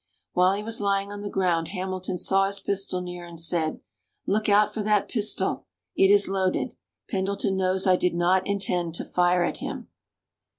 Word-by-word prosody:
While 180 +1 +4
he 205 - -4
was 225 0 -1
lying 200 0 0
on 205 0 -7
the 205 - -4
ground 175 -4 0
Hamilton 185 -1 -4
saw 195 +2 +2
his 200 0 -2
pistol 195 -2 -2
near 180 -1 -7
and 170 -1 -8
said, 165 -1 0 0.4
"Look 215 +2 0
out 205 +1 +4
for 220 - -3
that 210 -1 +2
pistol, 210 -4 -1 0.3
it 195 - +4
is 205 0 +5
loaded 190 -1 0 0.4
Pendleton 195 0 -1
knows 190 0 0
I 185 -1 +5
did 180 -1 0
not 180 +2 +2
intend 180 -4 -1
to - - -4
fire 180 0 +2
at - - -2
him!" - - -6
190 Hz, 180 wpm, -25 LUFS, 180-200 Hz, 0.4 s, is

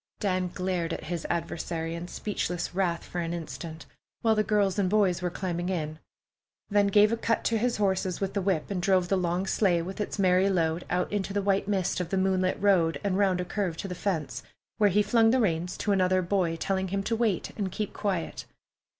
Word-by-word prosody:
Dan 185 -3 0
glared 180 -3 -2
at - - -5
his 170 0 -4
adversary 165 -1 -3
in 170 +1 -5
speechless 180 -3 -3
wrath 175 -3 0
for 175 - -4
an 170 0 -2
instant, 160 0 -7 0.4
while 225 -1 +4
the 215 - +2
girls 205 -2 +1
and 190 -2 +2
boys 190 -4 +2
were 180 - 0
climbing 175 0 -3
in, 155 -4 -3 0.7
then 205 0 +4
gave 210 +2 +5
a - - +2
cut 230 0 0
to 230 - +1
his 240 +2 0
horses 190 -3 0
with 195 -1 -2
the 200 - 0
whip 185 -2 0
and 185 -3 -1
drove 185 -2 +2
the 195 - +3
long 180 0 0
sleigh 190 -3 +2
with 190 +4 -5
its 210 - -3
merry 185 0 +4
load 165 -2 0
out 180 +3 -1
into 195 -1 -1
the 205 - +1
white 195 0 +1
mist 190 -4 0
of 180 -2 -3
the 195 - 0
moonlit 185 -1 +1
road 170 -7 +3
and 195 -1 0
round 190 -3 +3
a 180 - -2
curve 180 -4 -2
to 195 - -4
the 180 - -4
fence, 160 -9 -2 0.4
where 205 -1 +5
he 210 +2 +3
flung 225 +1 +4
the 260 +3 +3
reins 175 -5 0
to 210 - -1
another 185 -1 +3
boy, 175 -2 +1
telling 190 +3 -1
him 195 +2 -2
to 230 - 0
wait 220 -5 0
and 195 -3 -2
keep 210 +2 -3
quiet. 190 -6 -3
185 Hz, 220 wpm, -28 LUFS, 175-200 Hz, 0.7 s, gave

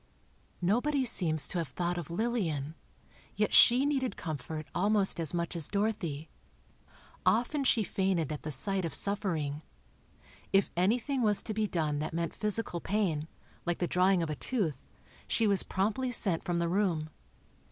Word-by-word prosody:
Nobody 260 +9 +1
seems 155 - +3
to 180 - -2
have 165 - -2
thought 175 +8 -2
of 165 - -7
Lillian; 170 - -1 0.6
yet - - 0
she 255 +3 +7
needed 265 -7 -1
comfort 155 0 -5
almost 200 0 +2
as 160 -3 0
much 170 0 -2
as 165 -4 -1
Dorothy. 200 -8 -2 1.0
Often 250 +5 +1
she 230 -3 +3
fainted 185 -5 0
at 150 - -4
the 155 - -5
sight 185 +8 0
of 165 - -2
suffering. 165 -8 -1 0.9
If 195 0 +3
anything 235 +9 +1
was 210 -3 +2
to 215 - -3
be 215 0 0
done 155 -5 -1
that 155 +2 -4
meant 170 -1 -2
physical 210 -4 -2
pain, 180 -7 -1 0.4
like 175 -1 -1
the 175 - 0
drawing 180 0 +3
of 155 - -3
a - - -2
tooth, 165 - -2 0.4
she 230 - +2
was 200 -2 +5
promptly 220 +7 -1
sent 190 -8 +1
from 175 -1 -1
the 170 0 0
room. 170 -4 0
185 Hz, 160 wpm, -30 LUFS, 160-215 Hz, 1.0 s, she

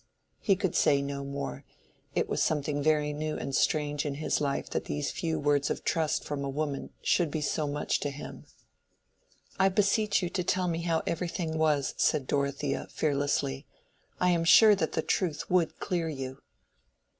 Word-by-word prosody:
He 195 - +3
could 185 -2 -2
say 140 -1 +4
no 140 0 -4
more: 140 - -5 0.5
it - - +1
was - - -1
something 145 -1 0
very 150 0 +2
new 155 +1 -3
and 135 - -4
strange 145 +1 +1
in 145 -2 -3
his 155 +1 -1
life 140 -1 -1
that - - -2
these 145 -1 -2
few 165 -2 -2
words 145 -1 +1
of - - -3
trust 160 -2 0
from 145 -1 -3
a 140 - -2
woman 145 0 -3
should 175 -3 +2
be 155 - -2
so 150 0 -1
much 145 +1 -1
to 145 - -2
him. 140 +1 -9 1.1
"I 190 0 +5
beseech 205 +1 +2
you 175 - -1
to 180 - -1
tell 180 0 +1
me 165 -1 -1
how 165 -1 0
everything 170 -1 -2
was," 150 -4 +1
said 135 - +2
Dorothea, 140 0 -1
fearlessly. 140 - -1 0.5
"I 180 0 +3
am 170 -1 +2
sure 210 +5 +8
that 175 -6 -1
the - - 0
truth 170 -4 -1
would 180 -3 +2
clear 175 -4 -1
you." 135 -2 -5
150 Hz, 180 wpm, -29 LUFS, 140-170 Hz, 1.1 s, sure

